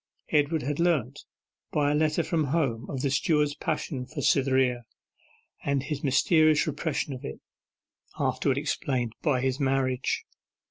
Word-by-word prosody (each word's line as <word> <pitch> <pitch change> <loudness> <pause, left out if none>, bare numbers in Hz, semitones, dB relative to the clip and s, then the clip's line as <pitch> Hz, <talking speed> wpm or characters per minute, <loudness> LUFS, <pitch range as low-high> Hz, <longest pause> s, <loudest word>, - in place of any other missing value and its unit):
Edward 150 +1 +2
had 145 +3 -2
learnt, 145 -6 0 0.5
by 145 -1 +2
a - - +2
letter 155 +2 +2
from 160 -2 0
home, 135 -6 -1
of 135 -3 -3
the 140 - +1
steward's 150 +1 +2
passion 145 -3 -3
for 155 - -7
Cytherea, 130 -3 +2 0.8
and 140 -1 0
his 145 0 -4
mysterious 155 +2 +4
repression 150 -1 -2
of 130 - -8
it, 65 - -6 0.8
afterwards 135 -1 0
explained 130 -5 -1
by 140 -6 +1
his 130 +1 -1
marriage. 135 -2 0
140 Hz, 140 wpm, -27 LUFS, 130-155 Hz, 0.8 s, mysterious